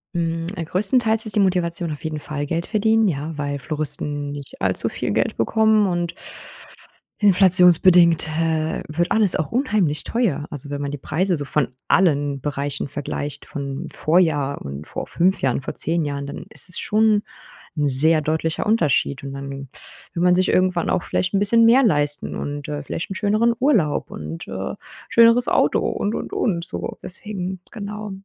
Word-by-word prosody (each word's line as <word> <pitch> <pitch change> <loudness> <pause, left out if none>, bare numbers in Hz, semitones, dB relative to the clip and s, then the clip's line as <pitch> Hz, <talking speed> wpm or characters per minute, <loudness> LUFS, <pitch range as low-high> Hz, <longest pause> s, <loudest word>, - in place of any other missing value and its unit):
Mm, 165 -1 -1
größtenteils 220 +7 +1
ist 215 - 0
die - - +4
Motivation 175 -3 +1
auf 145 - -10
jeden 155 -1 -4
Fall 145 -1 -5
Geld 165 +3 -2
verdienen, 220 0 +2
ja, 155 -2 -3
weil 145 -1 -3
Floristen 145 0 +1
nicht 140 -1 -10
allzu - - 0
viel - - -3
Geld - - -1
bekommen 220 - +3
und 175 -1 -2 1.1
inflationsbedingt, 180 -4 +5
äh, 160 0 -1
wird 170 +3 -2
alles 215 -4 +3
auch 155 - -2
unheimlich 210 - 0
teuer, 190 - -1
also, 145 -1 -2
wenn 145 0 -4
man 140 - -3
die 145 - -5
Preise 175 +5 -1
von 145 -1 0 0.2
allen 145 -6 +2
Bereichen 145 0 -3
vergleicht, 145 0 -5
vom 140 +3 -6
Vorjahr 155 -4 +1
und 70 +2 -7
vor - - -5
5 185 +3 +1
Jahren, 135 0 0
vor - - -6
10 165 +1 0
Jahren, 140 -1 -4
dann 140 - -8
ist - - -4
es 180 - -1
schon 215 0 +2 0.6
'n 145 -1 +1
sehr 155 +4 +4
deutlicher 160 +1 -2
Unterschied 155 - +1
und 140 - -6
dann 140 0 -7
will 140 +4 -9
man 180 0 +4
sich 185 +1 +1
irgendwann 185 -2 +1
auch - - 0
vielleicht 180 - -2
'n 195 - +2
bisschen 230 +3 +3
mehr 240 +4 +6
leisten 145 - 0
und, 145 0 -5
äh, 145 -1 -4
vielleicht 165 - -5
'n - - -4
schöneren 215 +3 +2
Urlaub 210 - +1
und, 80 +2 -7
äh, - - -5 0.3
schöneres 230 +1 +5
Auto - - +2
und, 205 - -2
und, - - -6
und, 170 -6 -1
so - - -3
deswegen 185 -1 -5
genau. 210 -1 -6
165 Hz, 170 wpm, -21 LUFS, 145-200 Hz, 1.1 s, mehr